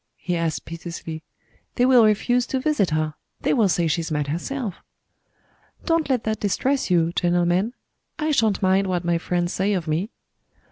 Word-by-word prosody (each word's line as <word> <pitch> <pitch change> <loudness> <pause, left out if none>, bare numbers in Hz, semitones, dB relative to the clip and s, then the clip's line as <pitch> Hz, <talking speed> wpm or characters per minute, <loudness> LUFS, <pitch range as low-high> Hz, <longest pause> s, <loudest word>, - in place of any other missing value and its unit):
he 180 -2 -2
asked 165 -2 -2
piteously. 165 -1 -7 0.5
"They 245 - +3
will 255 -2 +6
refuse 245 +4 +2
to 265 - -1
visit 260 - +1
her 155 -1 -1 0.3
they - - +1
will 220 -7 +3
say 175 -1 +1
she's 165 +1 -1
mad 150 -2 -1
herself." 205 - -3 1.1
"Don't 330 -4 +1
let 255 -4 +1
that 220 -1 -2
distress 255 +7 0
you, 170 -1 +2
gentlemen 175 +5 +1 0.4
I 310 0 0
shan't 220 -8 +2
mind 190 +1 +3
what 180 -2 -1
my 170 -1 +1
friends 175 0 -1
say 200 +2 +1
of 175 -4 -2
me." 165 +7 -1
185 Hz, 170 wpm, -23 LUFS, 170-240 Hz, 1.1 s, will